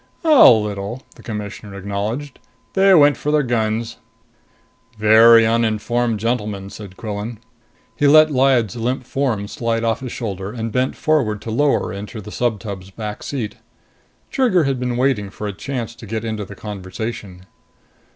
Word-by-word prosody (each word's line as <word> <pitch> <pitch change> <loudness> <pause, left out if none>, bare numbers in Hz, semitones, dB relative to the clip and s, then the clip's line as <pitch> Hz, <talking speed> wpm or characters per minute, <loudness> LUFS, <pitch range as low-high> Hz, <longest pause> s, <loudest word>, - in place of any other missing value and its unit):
"A 310 -4 +8
little," 105 +2 0
the - - -16
Commissioner 105 -2 -7
acknowledged. 105 +8 -4 0.3
"They 195 0 +4
went 145 -3 +5
for 150 - -2
their 150 -1 +3
guns." 115 -1 -1 1.0
"Very 110 +2 +7
uninformed 115 0 0
gentlemen," 105 -4 -2
said 100 -3 -10
Quillan. 110 +1 -5 0.6
He 145 +5 +2
let 155 +1 +7
Lyad's 130 -5 +2
limp 125 +3 -2
form 120 -6 -1
slide 115 +1 -2
off 115 -1 0
his 130 -2 -6
shoulder, 100 -3 -5
and 115 -2 -4
bent 125 +3 0
forward 130 -10 +1
to 115 - -5
lower 145 +5 +1
her - - -6
into 105 +3 -7
the 105 0 -9
subtub's 105 -6 -3
back 105 +1 -6
seat. 120 -7 -4 0.7
Trigger 235 -11 +3
had 135 -3 -1
been 125 -1 -2
waiting 125 -6 +1
for 105 - -7
a 105 - -3
chance 115 +1 -5
to 115 -1 -12
get 110 +2 -3
into 110 -2 -3
the 100 - -11
conversation. 100 -1 -7
115 Hz, 155 wpm, -20 LUFS, 105-125 Hz, 1.0 s, A